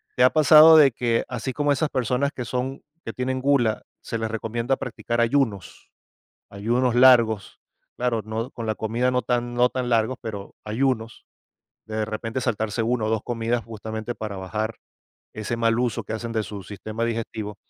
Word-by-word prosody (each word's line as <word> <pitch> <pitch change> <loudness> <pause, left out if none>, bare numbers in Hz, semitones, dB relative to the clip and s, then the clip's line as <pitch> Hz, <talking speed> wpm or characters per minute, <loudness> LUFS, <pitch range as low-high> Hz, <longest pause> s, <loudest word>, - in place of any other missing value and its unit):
¿Te 125 - +3
ha 130 - +7
pasado 155 +1 +8
de 140 -4 +7
que 115 0 0
así 125 +1 -4
como 145 +1 +1
esas 150 +3 0
personas 130 +2 0
que 125 - -5
son 130 +3 -3 0.2
que 115 - -4
tienen 130 +1 -2
gula, 130 -6 +2 0.2
se 115 - -4
les 110 0 -3
recomienda 115 +4 -2
practicar 120 -1 -4
ayunos 115 -5 -1 0.6
ayunos 120 +5 0
largos? 120 -5 +4 0.4
Claro, 120 -3 -1
no, 110 +2 -4
con 115 -1 -7
la 110 - 0
comida 115 +4 0
no 125 - +1
tan, 120 -1 -1
no 125 +1 +4
tan 125 -1 -3
largos, 115 +2 +1
pero 105 -4 -7
ayunos, 115 0 -2 0.6
de 110 0 -2
repente 115 +3 -4
saltarse 110 -2 -1
1 115 -1 0
o - - -1
2 110 -1 0
comidas, 115 0 -1
justamente 110 +1 -6
para 105 -3 -5
bajar 110 +4 -3 0.6
ese 110 +2 -4
mal 115 0 +1
uso 125 -2 -1
que - - -7
hacen 115 +1 -4
de 110 -1 0
su 100 -2 -7
sistema 110 +3 -5
digestivo. 110 -2 -4
115 Hz, 175 wpm, -24 LUFS, 110-125 Hz, 0.6 s, pasado